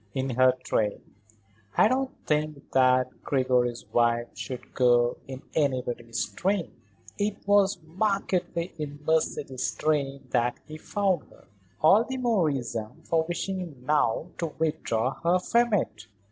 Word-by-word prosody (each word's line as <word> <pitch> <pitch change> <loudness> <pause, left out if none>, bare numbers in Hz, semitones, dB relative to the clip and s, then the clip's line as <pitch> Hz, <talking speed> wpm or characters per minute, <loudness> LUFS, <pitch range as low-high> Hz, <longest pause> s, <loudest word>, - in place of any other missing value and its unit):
"In 135 0 -1
her 130 +1 +5
train. 105 -2 -1 0.6
I - - +7
don't 260 +3 +1 0.2
think 150 -1 -1
that 130 -1 +3
Gregory's 125 -3 +1
wife 120 0 +2
should 130 -2 -7
go 120 -1 +3
in 130 0 -8
anybody's 125 -5 -1
train." 190 -1 -1 0.5
"It 205 -1 -2
was 205 -1 +4
markedly 180 -1 -1
in 145 -1 -5
Mercedes's 145 -5 0
train 140 -3 -1
that 120 -1 +1
he 155 0 -9
found 195 -2 -1
her." - - -20 0.4
"All 195 +8 +6
the 260 +2 -5
more 230 -9 +2
reason 120 -6 -4
for 160 -1 +1
wishing 175 -6 -4
now 150 +2 +1
to 170 - 0
withdraw 135 -6 -1
her 170 +2 +3
from 235 +6 +2
it. 110 - -1
150 Hz, 130 wpm, -27 LUFS, 125-180 Hz, 0.6 s, I